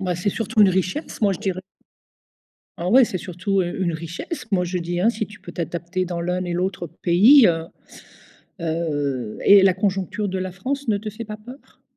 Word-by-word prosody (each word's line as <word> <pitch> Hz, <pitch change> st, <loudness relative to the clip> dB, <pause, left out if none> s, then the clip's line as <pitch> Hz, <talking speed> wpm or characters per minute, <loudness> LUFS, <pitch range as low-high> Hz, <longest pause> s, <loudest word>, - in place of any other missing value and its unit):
Bah, 180 Hz, -2 st, -1 dB
c'est 175 Hz, +3 st, 0 dB
surtout 220 Hz, +1 st, +1 dB
une 195 Hz, -, +6 dB
richesse, 185 Hz, -, -2 dB
moi, 200 Hz, -3 st, +3 dB
je -, -, -8 dB
dirais. 185 Hz, -2 st, -2 dB, 1.2 s
Oh 170 Hz, -, -4 dB
ouais, 255 Hz, +4 st, +7 dB
c'est 190 Hz, -, -4 dB
surtout 185 Hz, +2 st, -1 dB
u 175 Hz, +2 st, -3 dB
une 170 Hz, -2 st, 0 dB
richesse, 170 Hz, -, -6 dB
moi 180 Hz, -2 st, +2 dB
je 180 Hz, +1 st, -2 dB
dis, 175 Hz, +1 st, -3 dB
hein. 220 Hz, +5 st, +4 dB
Si 220 Hz, -2 st, -3 dB
tu 210 Hz, -, -14 dB
peux -, -, -10 dB
t'adapter 175 Hz, +1 st, -3 dB
dans 175 Hz, -1 st, -4 dB
l'un 180 Hz, +1 st, -1 dB
et 175 Hz, -, -3 dB
l'autre 180 Hz, 0 st, -2 dB
pays, 195 Hz, -, +5 dB
heu 165 Hz, -1 st, 0 dB, 1.0 s
heu 145 Hz, -8 st, -2 dB
et 200 Hz, 0 st, +8 dB
la 190 Hz, -1 st, +5 dB
conjoncture 195 Hz, +2 st, -1 dB
de 190 Hz, -, -3 dB
la 185 Hz, 0 st, -4 dB
France 270 Hz, +9 st, -4 dB
ne 210 Hz, -2 st, +2 dB
te 215 Hz, +1 st, -6 dB
fait 215 Hz, +2 st, -8 dB
pas 210 Hz, 0 st, -7 dB
peur? 245 Hz, +6 st, -14 dB
185 Hz, 205 wpm, -22 LUFS, 175-210 Hz, 1.2 s, et